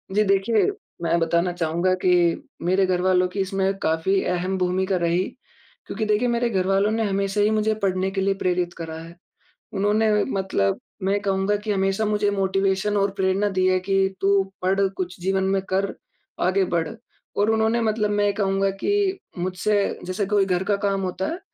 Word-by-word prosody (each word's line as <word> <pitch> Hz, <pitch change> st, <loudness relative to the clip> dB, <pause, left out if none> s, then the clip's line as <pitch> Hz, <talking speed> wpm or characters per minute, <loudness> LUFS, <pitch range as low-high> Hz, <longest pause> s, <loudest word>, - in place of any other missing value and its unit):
जी, 210 Hz, -, +4 dB
देखिए 195 Hz, -, +2 dB, 0.3 s
मैं 170 Hz, 0 st, +1 dB
बताना 170 Hz, +2 st, +1 dB
चाहूँगा 170 Hz, +2 st, 0 dB
कि 185 Hz, -, +3 dB, 0.5 s
मेरे 185 Hz, +3 st, +2 dB
घरवालों 185 Hz, 0 st, +2 dB
की 200 Hz, -, -4 dB
इसमें 195 Hz, 0 st, 0 dB
काफ़ी 165 Hz, +4 st, +1 dB
अहम 180 Hz, +1 st, -1 dB
भूमिका 185 Hz, +1 st, 0 dB
रही, 170 Hz, +1 st, +1 dB, 0.7 s
क्योंकि 220 Hz, -, -3 dB
देखिए 215 Hz, +3 st, +1 dB
मेरे 235 Hz, 0 st, +1 dB
घरवालों 195 Hz, 0 st, +1 dB
ने 225 Hz, +1 st, 0 dB
हमेशा 195 Hz, +1 st, 0 dB
ही 205 Hz, -, +4 dB
मुझे 215 Hz, 0 st, +1 dB
पढ़ने 190 Hz, 0 st, +1 dB
के 195 Hz, 0 st, -2 dB
लिए 195 Hz, 0 st, +2 dB
प्रेरित 180 Hz, -1 st, 0 dB
करा 160 Hz, -1 st, -6 dB
है। 165 Hz, +1 st, -11 dB, 0.6 s
उन्होंने 210 Hz, +2 st, +2 dB
मतलब 190 Hz, -, -1 dB, 0.2 s
मैं 200 Hz, +2 st, +1 dB
कहूँगा 195 Hz, 0 st, 0 dB
कि 210 Hz, +1 st, -4 dB
हमेशा 195 Hz, +2 st, 0 dB
मुझे 210 Hz, -1 st, +1 dB
मोटिवेशन 195 Hz, +1 st, 0 dB
और 200 Hz, 0 st, +1 dB
प्रेरणा 190 Hz, +2 st, +1 dB
दी 185 Hz, -1 st, +1 dB
है 185 Hz, 0 st, +3 dB
कि, 195 Hz, 0 st, 0 dB
"तू 195 Hz, 0 st, +3 dB, 0.2 s
पढ़, 190 Hz, +2 st, +1 dB, 0.2 s
कुछ 180 Hz, -1 st, -4 dB
जीवन 190 Hz, +1 st, 0 dB
में 195 Hz, 0 st, +1 dB
कर, 195 Hz, +1 st, 0 dB, 0.5 s
आगे 185 Hz, +2 st, +2 dB
बढ़" 165 Hz, -2 st, 0 dB, 0.5 s
और 205 Hz, +2 st, +2 dB
उन्होंने 220 Hz, +1 st, +2 dB
मतलब 215 Hz, -1 st, 0 dB
मैं 205 Hz, 0 st, +1 dB
कहूँगा 195 Hz, -1 st, +1 dB
कि 400 Hz, -2 st, +1 dB, 0.2 s
मुझसे 185 Hz, +3 st, 0 dB
जैसे 185 Hz, +3 st, -2 dB
कोई 200 Hz, 0 st, +2 dB
घर 180 Hz, -1 st, 0 dB
का 205 Hz, +1 st, +1 dB
काम 200 Hz, -1 st, -1 dB
होता 185 Hz, 0 st, -2 dB
है, 335 Hz, -, -4 dB
195 Hz, 175 wpm, -23 LUFS, 185-205 Hz, 0.7 s, जी